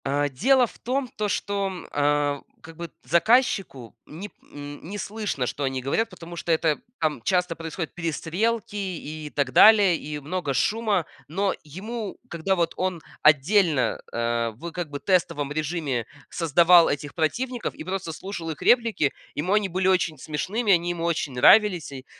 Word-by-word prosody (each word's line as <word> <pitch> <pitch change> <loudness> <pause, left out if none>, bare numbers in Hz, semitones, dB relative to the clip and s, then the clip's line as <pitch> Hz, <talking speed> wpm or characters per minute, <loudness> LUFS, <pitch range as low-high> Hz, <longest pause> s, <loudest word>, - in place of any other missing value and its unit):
А 145 +1 +1
дело 250 - +3
в - - -14
том 260 +2 -1
то, 210 - -1
что, 200 0 -1
м, 185 -3 -7
а, 145 -1 +1 0.2
как 160 +1 -12
бы 170 -2 -7
заказчику 170 - +1
не 185 +7 -8
п - - -39 0.2
нь 145 0 -8
не 195 +6 -6
слышно, 205 - -3
что 145 - -4
они 135 -1 -1
говорят, 220 - 0
потому 175 -3 -10
что 170 - -3
это 160 -2 +2 0.2
там 155 -6 -1
часто 180 -2 +1
происходят 165 0 -6
перестрелки 180 +7 -2
и 155 -6 -5
так 140 -3 0
далее, 205 - +7
и 150 0 -6
много 150 0 -3
шума. 210 - +1 0.2
Но 195 +5 0
ему, 205 +8 -6
когда 170 +3 -1
вот 170 -2 0
он 185 -3 -2 0.2
отдельно, 155 0 +3
э, 115 0 0
в 170 +9 -7
как 175 -4 -5
бы 145 - -5
тестовом 170 -6 0
режиме 150 -6 -2 0.2
создавал 170 +1 +5
этих 145 0 -4
противников 240 +10 -2
и - - -9
просто 185 -1 -4
слушал 165 -1 -6
их 150 - -9
реплики, 230 - +3 0.2
ему 180 +7 -1
они 210 -1 +2
были 185 +1 -1
очень 175 -5 +1
смешными, 195 - -1
они 175 -1 +3
ему 170 -1 -4
очень 160 -5 -1
нравились 180 - +5
и, 130 -1 -9
170 Hz, 170 wpm, -25 LUFS, 145-195 Hz, 0.2 s, далее